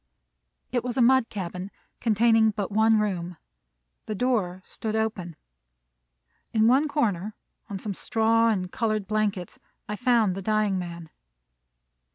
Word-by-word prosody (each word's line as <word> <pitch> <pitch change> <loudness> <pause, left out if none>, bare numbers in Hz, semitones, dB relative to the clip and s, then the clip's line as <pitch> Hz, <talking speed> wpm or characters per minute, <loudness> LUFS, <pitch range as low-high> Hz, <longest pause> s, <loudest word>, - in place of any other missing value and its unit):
It 245 -2 0
was 250 +1 -4
a - - +3
mud 260 -1 +4
cabin, 185 -1 -5 0.3
containing 225 0 +4
but 205 -2 -3
one 220 +1 +4
room. 180 -5 -2 0.7
The 215 - -3
door 190 -6 -1
stood 220 -1 -5
open. 210 -7 -2 1.2
In 220 -1 +3
one 270 +5 +4
corner, 215 - -1 0.3
on 200 - -4
some 200 +1 -4
straw 225 +2 +2
and 185 -4 -1
colored 215 -3 -1
blankets, 210 -3 -2 0.3
I 210 - -3
found 230 -4 +2
the 195 - -5
dying 210 -1 +1
man. 170 -2 -7
215 Hz, 135 wpm, -26 LUFS, 190-225 Hz, 1.2 s, mud